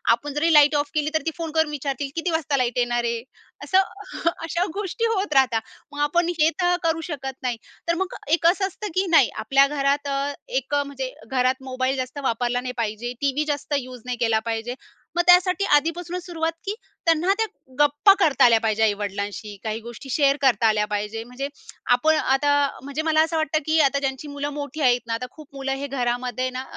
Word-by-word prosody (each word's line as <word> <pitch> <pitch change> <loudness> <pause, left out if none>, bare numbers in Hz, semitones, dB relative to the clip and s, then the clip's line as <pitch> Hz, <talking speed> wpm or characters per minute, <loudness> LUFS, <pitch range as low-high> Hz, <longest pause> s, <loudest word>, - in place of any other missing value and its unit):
आपण 285 +4 -8
जरी 310 +3 +2
light 295 0 +6
of 290 0 0
केली 305 -1 0
तर 315 - +1
ती 325 - 0
फोन 330 -2 -4
करून 320 -1 +1
विचारतील 280 -1 -3
"किती 335 +1 -1
वाजता 305 -3 0
लाईट 250 -2 0
येणार 240 -1 +1
आहे?" 235 -1 -2 0.4
असं 375 - +2 0.4
हं. 335 - +1
अशा 340 +2 0
गोष्टी 415 +4 -2
होत 390 -5 -1
राहतात, 260 -5 +3 0.3
मग 290 - -8
आपण 340 +4 +2
हे 310 +1 +5
तर 355 0 +3
करू 325 0 +1
शकत 270 -2 -6
नाही. 245 -2 -1 0.3
तर 335 - +3
मग 380 - -3 0.2
एक 335 - +2
असं 385 +3 +3
असतं 405 +3 -7
की 380 +1 +2
नाही 320 -7 +6 0.2
आपल्या 275 +4 +5
घरात 285 0 0
अ, 280 +1 -1 0.2
एक 265 +2 -1
म्हणजे 280 -2 -2 0.2
घरात 260 +1 +1
मोबाईल 260 0 -1
जास्त 255 +2 -4
वापरला 245 0 0
नाही 250 0 -5
पाहिजे. 230 +1 -3
टीव्ही 280 +2 +1
जास्त 290 +1 -6
यूज 255 -2 -9
नाही 250 -1 -3
केला 225 -2 +3
पाहिजे. 225 +2 -3 0.4
मग - - +5
त्यासाठी 365 +2 +5
आधीपासूनच 340 +3 -1
सुरुवात, 330 -2 -2
की 395 - -1 0.3
त्यांना 330 +3 +3
त्या 445 - +3 0.3
गप्पा 290 +7 +6
करता 310 -8 +4
आल्या 230 -2 +6
पाहिजे 220 0 +1
आई-वडिलांशी, 205 0 -2
काही 220 0 -3
गोष्टी 235 +4 -10
शेअर 280 0 +3
करता 240 -5 +4
आल्या 210 -1 +2
पाहिजे. 210 +2 -3
म्हणजे 250 +4 -5 0.5
आपण 315 +6 +3
आता 270 0 +1 0.2
अ, 275 - -6
म्हणजे 280 +2 -3
मला 315 -1 +3
असं 325 0 -2
वाटतं 315 0 +1
की 315 +1 +2
आता 280 -1 +3
ज्यांची 270 +1 -3
मुलं 285 0 -4
मोठी 290 +1 -5
आहेत 245 -2 +4
ना, 230 - -2
आता 230 +2 -3
खूप 310 -2 -14
मुलं 270 0 -3
हे 285 - -3
घरामध्ये 250 -1 -1
ना, 255 0 -5
275 Hz, 205 wpm, -23 LUFS, 245-315 Hz, 0.5 s, लाईट